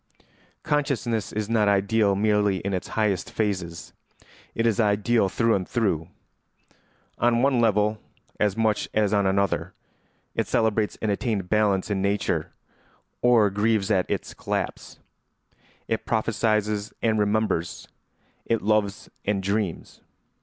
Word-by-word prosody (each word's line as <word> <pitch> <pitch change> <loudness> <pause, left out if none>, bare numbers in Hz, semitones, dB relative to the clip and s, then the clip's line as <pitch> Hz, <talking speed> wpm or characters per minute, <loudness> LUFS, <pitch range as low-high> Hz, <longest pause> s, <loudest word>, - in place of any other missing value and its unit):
] - - -35
Consciousness 120 -8 -1
is 105 -1 -3
not 110 -2 +2
ideal 100 +1 +2
merely 105 -1 +2
in 100 0 -3
its 90 - -3
highest 105 -4 0
phases; 90 -6 -3 0.6
it 115 - 0
is 115 -2 +2
ideal 105 0 +2
through 115 +3 +2
and 95 -2 -1
through. 95 -10 0 1.1
On 120 0 +3
one 135 -3 +3
level 105 -1 +2 0.4
as 105 -1 +1
much 110 -2 +1
as 105 -1 +2
on 100 -2 +3
another, 100 0 0 0.6
it - - -1
celebrates 110 -1 +1
an 110 - +1
attained 100 -3 -2
balance 105 -2 +1
in 95 -2 0
nature, 100 +1 -1 0.7
or 115 -5 +4
grieves 105 0 +1
at 95 -3 +1
its - - -3
collapse; - - -4 0.9
it 110 - -1
prophesies 110 -2 0
and 110 -1 +2
remembers, 105 -5 0 0.6
it 115 -1 0
loves 105 -1 0 0.2
and 100 -1 -1
dreams. 100 -2 -3
105 Hz, 130 wpm, -25 LUFS, 100-110 Hz, 1.1 s, or